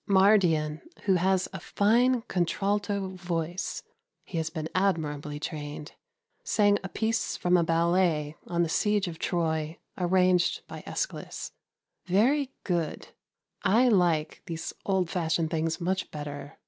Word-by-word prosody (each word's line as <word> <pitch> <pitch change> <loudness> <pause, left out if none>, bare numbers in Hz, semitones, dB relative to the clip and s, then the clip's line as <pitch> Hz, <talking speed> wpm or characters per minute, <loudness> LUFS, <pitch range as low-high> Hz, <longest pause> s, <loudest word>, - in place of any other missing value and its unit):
Mardian, 180 -6 +4 0.2
who 195 - +3
has 185 +1 +2
a 190 - -5
fine 235 +7 +2
contralto 200 +1 -1
voice 175 -1 -3 0.4
(he 170 - -3
has 160 0 -1
been 160 -1 -4
admirably 150 -6 0
trained), 150 0 -6 0.5
sang 205 - +3
a 190 - -5
piece 225 +2 -1
from 180 0 +2
a 175 - +4
ballet 165 -2 +2
on 175 0 +1
the - - 0
siege 205 +4 +1
of 165 -2 -6
Troy 160 -2 -1 0.2
arranged 180 0 +2
by - - -8
Æschylus. - - -4 0.6
Very 260 +9 +3
good. 170 -4 -2 0.5
I 235 +6 +4
like 170 -7 +2
those 165 -1 -4
old 190 -3 +2
fashioned 160 -2 0
things 165 0 -1
much 185 +2 -1
better. 145 -1 -7
175 Hz, 130 wpm, -28 LUFS, 160-195 Hz, 0.6 s, Mardian